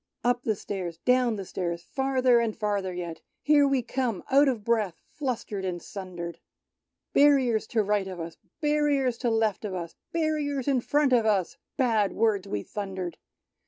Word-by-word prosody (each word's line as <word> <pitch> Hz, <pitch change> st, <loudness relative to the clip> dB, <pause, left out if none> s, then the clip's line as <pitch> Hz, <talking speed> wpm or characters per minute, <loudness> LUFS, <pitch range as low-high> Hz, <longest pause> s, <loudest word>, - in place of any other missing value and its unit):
Up 245 Hz, 0 st, +2 dB
the 220 Hz, -3 st, 0 dB
stairs, 185 Hz, -4 st, -5 dB
down 250 Hz, -2 st, +3 dB
the 195 Hz, -2 st, -5 dB
stairs. 170 Hz, -2 st, -3 dB
Farther 260 Hz, +1 st, +2 dB
and 230 Hz, -2 st, -1 dB
farther 205 Hz, -3 st, -1 dB
yet: 175 Hz, -2 st, -6 dB, 0.2 s
Here 290 Hz, -1 st, +5 dB
we 270 Hz, -3 st, +1 dB
come 245 Hz, -5 st, -2 dB
out 280 Hz, +2 st, +6 dB
of 240 Hz, -6 st, 0 dB
breath. 210 Hz, -7 st, 0 dB
Flustered 235 Hz, -8 st, -3 dB
and 180 Hz, -2 st, -2 dB
sundered, 175 Hz, -2 st, -7 dB, 0.7 s
Barriers 270 Hz, -6 st, +4 dB
to 220 Hz, -2 st, +1 dB
right 205 Hz, -1 st, +1 dB
of 185 Hz, -2 st, -6 dB
us. 165 Hz, 0 st, -6 dB, 0.3 s
Barriers 290 Hz, -5 st, +2 dB
to 245 Hz, -, +1 dB
left 225 Hz, -2 st, +1 dB
of 200 Hz, -3 st, -3 dB
us. 170 Hz, -2 st, -5 dB, 0.2 s
Barriers 300 Hz, -5 st, -1 dB
in 265 Hz, -3 st, +2 dB
tront 285 Hz, +1 st, +2 dB
of 230 Hz, -3 st, +4 dB
us! 195 Hz, -5 st, +1 dB, 0.2 s
Bad 225 Hz, -7 st, +2 dB
words 210 Hz, -4 st, +1 dB
we 105 Hz, -, -3 dB
thundered. 190 Hz, -4 st, -5 dB
225 Hz, 165 wpm, -27 LUFS, 190-265 Hz, 0.7 s, out